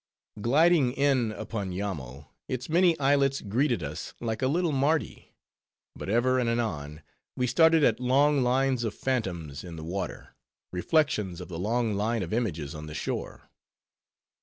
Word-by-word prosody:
Gliding 145 +2 +4
in 135 -5 +2
upon 105 -2 -4
Yammo, 75 -9 -5 0.2
its 130 -1 -4
many 170 0 +3
islets 140 -1 +3
greeted 120 - 0
us 75 +1 -6
like 110 -2 -3
a 130 - +2
little 170 +4 +1
Mardi; 140 -2 -1 0.6
but - - -7
ever 130 +4 +2
and 120 -2 +1
anon 80 -11 -3 0.3
we 125 - +1
started 160 +5 +4
at 115 -3 +3
long 140 +3 +3
lines 130 0 +1
of 110 - -3
phantoms 90 - -3
in 85 -2 -8
the 80 - -8
water, 90 +2 -5 0.4
reflections 100 - 0
of 90 - -8
the 85 -2 -6
long 115 +3 0
line 110 +2 0
of 85 - -5
images 85 - -2
on 75 -1 -8
the 75 - -8
shore. - - -5
115 Hz, 155 wpm, -28 LUFS, 90-135 Hz, 0.6 s, Gliding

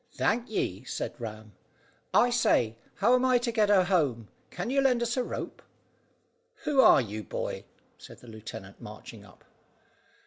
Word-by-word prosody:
"Thank 235 +2 0
ye," 95 - -2
said - - -4
Ram. 110 -2 -7 0.6
"I 245 - +4
say, 120 - +2 0.2
how 235 +5 +3
am 255 0 +3
I 255 -1 +4
to 240 0 -1
get 215 -3 +2
her 195 -3 +5
home? 145 - 0 0.2
Can 180 +7 -4
you 275 0 +3
lend 250 -3 +3
us 235 0 -1
a 255 - +1
rope?" - - -6 1.0
"Who 280 -3 +4
are 225 - +7
you, 110 -2 -5
boy?" - - -5 0.3
said - - -12
the 125 - -16
lieutenant, 110 -3 -10
marching 105 0 -10
up. 95 -3 -19
185 Hz, 165 wpm, -28 LUFS, -, 1.0 s, are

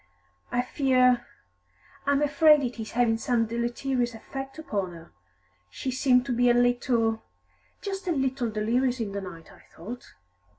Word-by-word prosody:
I 245 - +1
fear 255 -2 +2 0.8
I 285 - +4
am 285 +1 +2
afraid 300 0 +5
it 245 -2 -4
is 220 - -7
having 230 -1 +2
some 235 -1 +1
deleterious 240 +1 -2
effect 270 +4 -7
upon 200 - -3
her; 165 0 -13 0.6
she 260 - -4
seemed 250 -1 +3
to 260 - -1
be 245 +1 +4
a 240 - +4
little 240 -2 +2 0.6
just 390 -2 -5
a - - +2
little 265 -5 0
delirious 240 +4 0
in 215 -3 -3
the 200 0 -4
night, 170 -4 -10
I - - -18
thought." 230 +9 -11
245 Hz, 160 wpm, -27 LUFS, 225-265 Hz, 0.8 s, afraid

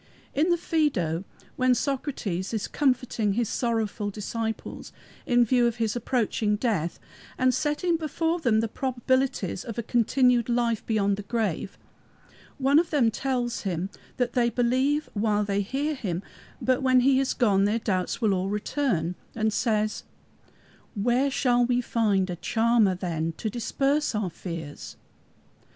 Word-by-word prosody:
In 310 +5 +2
the 345 - +4
Phædo, 205 - 0 0.3
when 255 -1 +3
Socrates 235 - -2
is 210 - -2
comforting 250 -6 +1
his 235 +2 0
sorrowful 225 -3 -1
disciples 220 +2 -5 0.4
in 245 -1 +4
view 245 +1 +3
of 235 - -1
his 225 -2 -1
approaching 230 -3 0
death, 205 -7 -1 0.4
and 255 0 +3
setting 325 +5 0
before 325 +2 -1
them 230 -8 +2
the 225 - 0
probabilities 260 -5 -1
of 230 -2 -7
a 235 - -1
continued 245 +1 +2
life 235 -2 +1
beyond 200 -3 +1
the - - -4
grave, 205 -4 -2 0.8
one 280 +2 +4
of 340 - 0
them 255 -7 +3
tells 245 -1 -2
him 185 0 -3 0.3
that 245 -1 0
they 240 -1 +3
believe 260 +5 +1
while 210 0 +1
they 200 0 0
hear 275 +9 -1
him, 190 - -3 0.4
but 255 0 +1
when 255 -1 +4
he 265 +1 +4
is 270 - 0
gone 200 -5 +3
their 210 +2 +1
doubts 190 -5 -1
will 215 -4 +2
all 190 +1 -1
return, 210 - -1 0.2
and 220 -1 0
says, 215 -1 0 0.9
"Where 245 +6 +2
shall 245 -2 +2
we 245 0 +2
find 210 -6 +1
a - - -3
charmer 225 -1 +2
then 165 -3 -3
to 220 - -3
disperse 275 +4 0
our 205 -4 -1
fears?" 165 -4 -7
235 Hz, 150 wpm, -26 LUFS, 205-260 Hz, 0.9 s, the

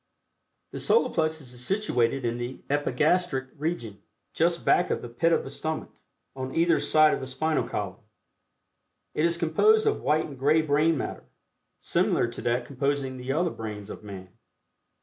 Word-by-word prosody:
The - - -6
Solar 465 - +2
Plexus 155 -5 -1
is 125 0 -6
situated 135 - +1
in 120 0 -1
the 120 +2 -6
Epigastric 145 0 +1
region, 145 - -4 0.3
just 170 +1 +1
back 180 - +3
of - - -2
the - - -5
"pit 145 +8 +1
of - - +2
the - - -8
stomach" 160 0 -4 0.4
on 130 0 -5
either 165 0 +3
side 155 0 +4
of - - -1
the 130 - -6
spinal 155 +4 -1
column. 100 0 -4 1.1
It 155 - +1
is 170 0 +1
composed 425 - +3
of 430 - +1
white 155 +1 +2
and 140 -4 -10
gray 150 +4 +3
brain 155 +2 +2
matter, - - -5 0.6
similar - - +1
to - - -8
that 120 +1 0
composing 140 0 -2
the 125 +1 -4
other 165 +4 +1
brains 105 -2 -7
of - - -9
man. 95 -3 -9
145 Hz, 170 wpm, -27 LUFS, 125-165 Hz, 1.1 s, side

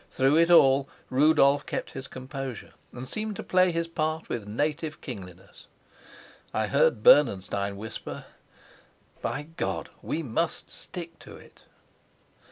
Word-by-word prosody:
Through 135 +3 +3
it 170 +1 +4
all 140 -4 +6 0.2
Rudolf 145 +1 +4
kept - - -4
his 135 +1 -7
composure, 130 -2 -7 0.2
and 125 +1 -8
seemed 215 +6 -3
to - - -6
play 185 0 +3
his 165 0 -1
part 155 -1 -2
with 110 -4 -4
native 150 +7 -2
kingliness. 95 - -10 0.9
I - - +1
heard 105 - +2
Bernenstein 100 -7 +4
whisper, 110 +2 -7 1.0
"By 145 - -2
God, 165 +2 -4
we 165 - -3
must 160 +6 -2
stick 170 -2 -7
to - - -12
it!" - - -17
140 Hz, 130 wpm, -27 LUFS, 125-165 Hz, 1.0 s, all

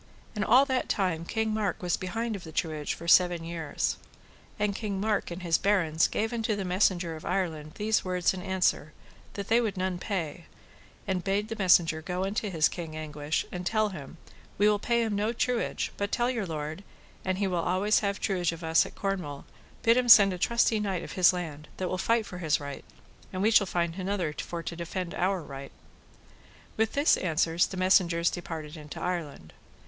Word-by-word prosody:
And 210 - 0
all 260 +5 +6
that 260 -2 -1
time 175 -5 0
King 220 +3 -1
Mark 210 -4 -1
was 175 -1 +1
behind 225 +4 -3
of 190 - -8
the 160 - -9
truage 155 -2 -2
for 170 - -9
seven 175 -1 +5
years. 165 -3 -2 0.6
And 210 -2 0
King 200 -3 -3
Mark 210 0 0
and 175 +1 -7
his 165 -2 +2
barons 175 -6 +2
gave 220 +2 -2
unto 225 -2 0
the 200 -1 -3
messenger 180 -2 +1
of 155 - -10
Ireland 160 -5 -2
these 215 +1 +1
words 180 -1 +1
and 185 - -6
answer, 185 -5 0 0.4
that 200 -1 -5
they 230 +2 +4
would 215 -5 -2
none 185 -1 -1
pay; 175 -5 -4 0.6
and 185 -2 -1
bade 200 +2 0
the 225 - -3
messenger 175 -5 +4
go 180 +3 -3
unto 205 +2 -2
his 160 -4 +3
King 165 -3 -7
Anguish, 150 -1 -3
and 180 0 -5
tell 215 +3 +1
him 165 -3 -9 0.4
we 205 - +4
will 210 -1 +3
pay 235 +2 +1
him 220 -2 -1
no 210 +3 0
truage, 245 0 -1
but 200 0 -2
tell 240 +1 +1
your 225 -6 -3
lord, 155 +3 -5 0.4
an 185 0 0
he 200 +2 -1
will 180 -2 0
always 185 +5 +2
have 200 -1 -2
truage 180 -5 0
of 165 0 -8
us 160 0 +3
of - - -14
Cornwall, 180 -8 -3 0.4
bid 230 +1 +5
him 250 -1 +1
send 200 -4 +9
a 180 - -6
trusty 235 +1 +2
knight 195 -4 -2
of - - -8
his 185 -1 +5
land, 155 -5 -6
that 185 -1 -2
will 185 - -2
fight 230 +2 +2
for 180 -2 -8
his 155 -4 +1
right, 140 -1 -7 0.5
and 185 0 -2
we 220 - +4
shall 205 -3 +5
find 170 -1 -1
another 185 -3 -2
for 170 +2 -5
to 170 - -5
defend 175 +1 -4
our 185 -1 0
right. 135 -1 -9 1.0
With 220 0 0
this 285 +2 +4
answer 165 -2 0
the 185 - +2
messengers 180 -2 +3
departed 160 -3 -6
into 150 -2 -9
Ireland. 160 - -4
185 Hz, 200 wpm, -28 LUFS, 165-205 Hz, 1.0 s, send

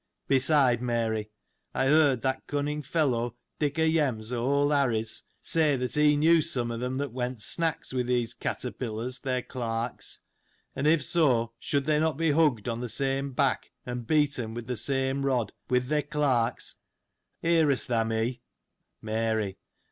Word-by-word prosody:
Beside, 135 -3 +4
Mary, 115 -3 -1 0.5
I 135 - +1
heard 145 -3 +4
that 130 0 -2
cunning 145 +1 -2
fellow, 125 -6 0 0.2
Dick 145 0 -1
o' 160 - +3
Yem's, 135 -8 +1
o' 120 -1 -1
old 140 +2 +2
Harry's, 120 -6 +1 0.2
say 155 -3 +3
that 125 -1 -3
he 150 0 +4
knew 160 +2 +5
some 120 -5 -2
of 115 - -4
them 125 +1 -2
that 140 -1 -2
went 125 -2 -3
snacks 165 -5 -1
with 125 -1 -1
these 120 -1 0
caterpillars, 125 0 -4
their 130 -2 -2
clerks; 115 -1 -4 0.6
and 140 +2 0
if 155 -2 +4
so, 125 -10 +2
should 140 0 -1
they 150 0 +2
not 155 -2 +1
be 165 -1 +2
hugged 145 -9 +2
on 115 -1 -2
the 125 - -4
same 135 +3 -1
back, 135 0 0 0.2
and 125 -2 -5
beaten 140 -7 +1
with 120 -1 -5
the 125 +1 -3
same 135 +2 -1
rod, 125 -6 0 0.2
with 125 0 +2
their 150 +1 +1
clerks 140 -5 0 0.3
— - - -52
hearest 160 -5 +3
thou 115 -2 +1
me? 115 +2 -2 0.6
Mary. 110 -3 -1
130 Hz, 165 wpm, -28 LUFS, 120-145 Hz, 0.6 s, knew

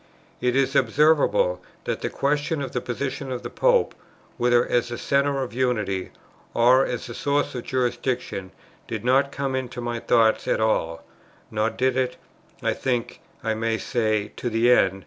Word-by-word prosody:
It 125 0 +1
is 135 0 +2
observable 155 - +3 0.2
that - - -3
the - - -1
question 145 +2 0
of 135 - -5
the 125 - -2
position 130 +2 -4
of 125 - -4
the - - -6
Pope, - - +3 0.4
whether 120 0 +3
as 120 0 +1
the 120 0 -5
centre 140 -1 +1
of 125 - -7
unity, 110 -7 -1 0.5
or 125 +3 +5
as 125 -3 -3
the 120 - -7
source 145 +4 0
of 125 -2 -5
jurisdiction, 125 -6 -2 0.4
did - - -5
not 135 +2 +3
come 135 -1 -2
into 125 -2 -4
my 120 -1 -3
thoughts 115 -2 +3
at - - +1
all; 85 -7 0 0.5
nor 110 0 +1
did 130 +2 0
it, 130 -1 0 0.5
I - - +2
think 125 -3 -2 0.2
I 110 - 0
may 115 +1 -1
say, 110 -3 -1
to 120 - -2
the 115 +2 +3
end. 95 -5 +4
125 Hz, 170 wpm, -24 LUFS, 115-135 Hz, 0.5 s, or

